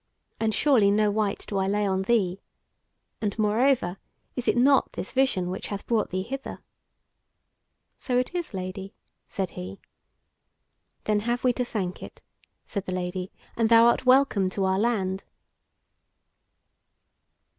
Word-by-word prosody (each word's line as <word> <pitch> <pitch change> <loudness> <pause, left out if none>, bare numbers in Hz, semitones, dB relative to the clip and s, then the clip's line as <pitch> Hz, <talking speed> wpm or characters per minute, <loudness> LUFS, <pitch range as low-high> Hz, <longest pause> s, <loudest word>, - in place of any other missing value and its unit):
And 220 -1 +1
surely 230 -5 +4
no 210 +1 +3
wyte 210 -1 -1
do 200 - -1
I 190 - 0
lay 205 +1 +1
on 190 -1 0
thee. 195 -3 +1 0.8
And, 205 -1 -2
moreover, 215 -2 +2 0.4
is 250 - -4
it - - +3
not 270 +2 +4
this - - -5
vision 200 -10 +1
which 185 - -5
hath 200 -1 -5
brought 225 -3 0
thee 185 0 -2
hither?" 270 +6 -6 1.4
"So 250 -2 -1
it 250 +7 0
is, 350 -2 -3
Lady," 190 0 -6 0.3
said 190 -3 -3
he. 95 +2 -8 1.2
"Then 210 -1 +1
have 240 +3 -2
we 250 -1 +3
to 250 - -1
thank 195 -7 -4
it," - - -11 0.4
said 200 -2 -4
the - - -2
Lady, 180 0 -3 0.2
"and 225 -1 +2
thou 230 0 +7
art 235 - +3
welcome 255 -7 +4
to 190 +1 -1
our 190 0 +1
land." 195 -4 0
210 Hz, 145 wpm, -26 LUFS, 190-240 Hz, 1.4 s, thou